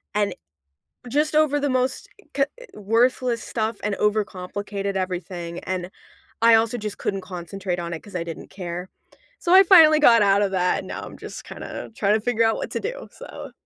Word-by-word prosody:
And 205 -1 +1 0.8
just 300 +4 +1
over 305 -1 +3
the 285 0 0
most 255 0 -1 0.3
co 275 0 +2 0.3
worthless 230 +3 +1
stuff 220 0 -2
and 210 - -1
overcomplicated 200 -1 -2
everything 180 -2 -4
and 185 -1 -3 0.5
I 230 0 +7
also 230 +2 +2
just 210 -2 -5
couldn't 195 -1 -2
concentrate 180 0 -5
on 170 0 -4
it 160 - -6
'cause 205 - -13
I 175 - -1
didn't 165 -1 -8
care. 180 -1 -6 0.5
So 345 - +1
I 380 +1 +9
finally 325 -5 +7
got 235 -6 +6
out 200 0 +4
of 200 - 0
that, 180 -1 +1
and - - -8
now - - -5
I'm - - -10
just - - -8
kinda - - -8
trying 205 -2 +2
to - - +1
figure 230 0 +1
out 225 - +2
what - - -4
to - - -2
do. - - -5
So - - -10
210 Hz, 190 wpm, -23 LUFS, 185-245 Hz, 0.8 s, I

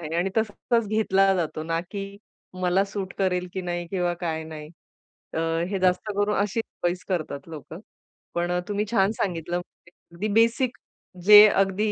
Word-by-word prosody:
आहे 160 -1 -5
आणि 180 +3 0
तसा 220 -2 +1 0.2
तसाच 230 -2 +4
घेतला 195 -2 +3
जातो, 160 -3 -2
ना 165 +1 -1
की 200 -1 -4 0.6
मला 180 +2 +3
सूट 195 -1 -5
करेल 180 -2 0
की 190 - -3
नाही 175 -1 -3
किंवा 180 -2 0
काय 160 -1 -2
नाही 155 -1 -9 0.7
अ, - - -1 0.3
हे 195 -1 -2
जास्त 185 -1 +2
करून 205 +1 +1
अशीच 210 +3 0 0.2
चॉइस 175 0 -1
करतात 155 -5 -3
लोकं. 160 +1 -9 0.6
पण 175 +1 0
अ, 180 - +1
तुम्ही 205 +1 -1
छान 195 -2 +3
सांगितलं 175 -2 -2
म्हणजे 175 -1 -12 0.2
अगदी 200 +5 -2
बेसिक, 235 +2 +1 0.5
जे 210 +1 +11
अगदी 195 +2 +1
185 Hz, 170 wpm, -25 LUFS, 175-205 Hz, 0.7 s, जे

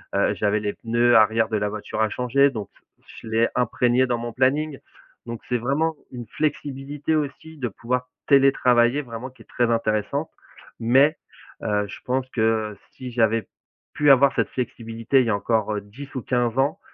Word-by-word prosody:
heu, - - +2
j'avais 105 0 +1
les 105 -1 -2
pneus 120 +1 +2
arrière 110 +1 +4
de 110 - 0
la 105 0 -1
voiture 110 +1 -4
à 110 - +2
changer. 130 +5 +2
Donc, 110 -5 -6 0.4
je - - -12
l'ai 115 +1 +2
imprégné 125 +1 +2
dans 120 -1 0
mon 120 0 -5
planning. 135 +3 +1 0.5
Donc, 115 -1 -6
c'est 125 - +1
vraiment 150 +7 0 0.2
une 120 -2 -7
flexibilité 145 +1 -2
aussi 155 +2 -4
de 125 -4 -2
pouvoir 125 +4 -3 0.2
télétravailler 135 -2 +4
vraiment 120 0 -7
qui 130 - -18
est - - -35
très 120 -1 0
intéressante. 115 +6 -1 0.5
Mais, 135 +7 +4 0.5
heu, 105 -1 0
je - - -9
pense 130 +1 -1
que, 115 - -2
heu, 110 -2 0
si 125 -1 -8
j'avais 115 -1 +1 0.5
pu 145 -1 +4
avoir 135 +1 +6
cette - - 0
flexibilité 115 +1 -1
il - - 0
y - - 0
a - - +2
encore, 110 0 0
heu, 105 - -3
10 125 +8 -11
ou 130 - -2
15 120 -1 0
ans, 145 +7 +1
120 Hz, 185 wpm, -23 LUFS, 110-135 Hz, 0.5 s, avoir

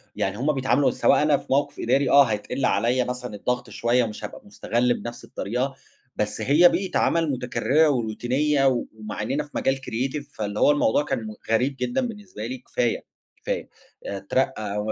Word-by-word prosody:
يعني 95 +1 -1
هُم 140 +6 +1
بيتعاملوا 130 0 +2
سواء - - +3
أنا 150 -1 +4
في - - -12
موقف 140 +2 +1
إداري 135 +4 +2
آه، 140 0 +8
هيتقِل 125 +3 -2
عليّا 120 +6 +2
مثلًا 125 -2 -5
الضغط 125 +4 -2
شوية، 120 +1 +1
مش 105 -1 -6
هابقى - - -9
مُستغَل 120 +4 0
بنفس 120 0 -7
الطريقة، 125 +6 -3 0.4
بس 105 0 -2
هي 160 +6 +6
بيئة 180 +2 -1
عمل 165 -3 +2
مُتكررة 135 +4 +2
وروتينية 130 +4 +1
و 125 -3 +1
ومع 110 -1 -6
إننا 135 +8 -1
في 150 - -16
مجال 135 - +1
Creative 135 +3 -3
فاللي 105 -1 -3
هو - - +6
الموضوع 145 -1 +2
كان 135 -3 -2
م 110 - -6 0.2
غريب 125 +5 +2
جدًا 125 - 0
بالنسبة 205 - -8
لي، 130 +3 -4
كفاية، 120 -1 -2 0.4
كفاية - - -3 0.4
اترقي 100 +1 -2
أو 105 +1 -1
125 Hz, 175 wpm, -24 LUFS, 110-140 Hz, 0.4 s, آه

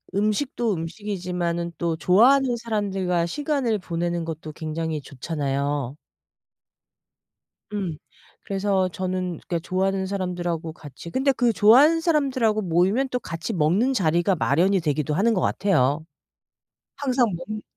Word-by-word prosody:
음식도 215 +2 0
음식이지만은 175 -1 -3
또 170 -1 -1
좋아하는 245 +9 +4
사람들과 195 -6 -1
시간을 270 - -1
보내는 170 -1 -2
것도 160 -1 -6
굉장히 160 -1 -3
좋잖아요. 140 -1 -3 1.8
음. 190 -7 -3 0.5
그래서 195 -1 0
저는 185 -2 -3
그러니까 170 -3 -1
좋아하는 190 +2 -1
사람들하고 175 -4 -3
같이 155 +1 -11
근데 270 +7 +2
그 245 -3 +1
좋아하는 280 +12 +6
사람들하고 260 -9 +1
모이면 190 +9 +2
또 250 - -1
같이 165 -7 -5
먹는 185 - +2
자리가 175 -2 +2
마련이 175 +6 +2
되기도 150 -1 -1
하는 210 +8 +2
것 195 - +1
같아요. 155 -6 +1 0.9
항상 255 -3 +2
먹는 210 +5 -6
185 Hz, 315 characters per minute, -24 LUFS, 165-215 Hz, 1.8 s, 좋아하는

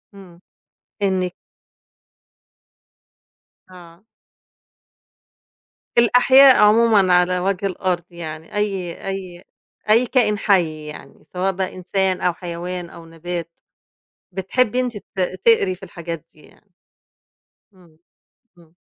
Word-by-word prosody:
إمم 180 -3 -15 0.6
إنِك 185 -2 0 2.4
آه. 175 0 -16 1.9
الأحياء 260 +3 +6
عمومًا 210 -3 +4
على 180 0 +3
وجه 195 +1 -2
الأرض 180 -2 -2
يعني 160 0 -9
أي 195 -4 -3
أي 185 -2 -6 0.5
أي 230 +4 +5
كائن 225 -5 +1
حي 170 -7 +1
يعني 150 - -12
سواء 185 +1 -2
بقى 190 0 -4
إنسان 185 0 -1
أو 180 - +1
حيوان 175 0 -6
أو 165 -1 -13
نبات 165 +1 -6 0.8
بتحبّي 210 +6 0
أنتِ 250 -3 -2
ت 195 -1 -11 0.3
تقري 200 -5 +4
في 195 - -19
الحاجات 170 -3 -7
دي 155 - -21
يعني. 200 +5 -23 1.0
إمم، 175 -4 -23 0.6
إمم. 165 0 -22
185 Hz, 100 wpm, -20 LUFS, 175-200 Hz, 2.4 s, الأحياء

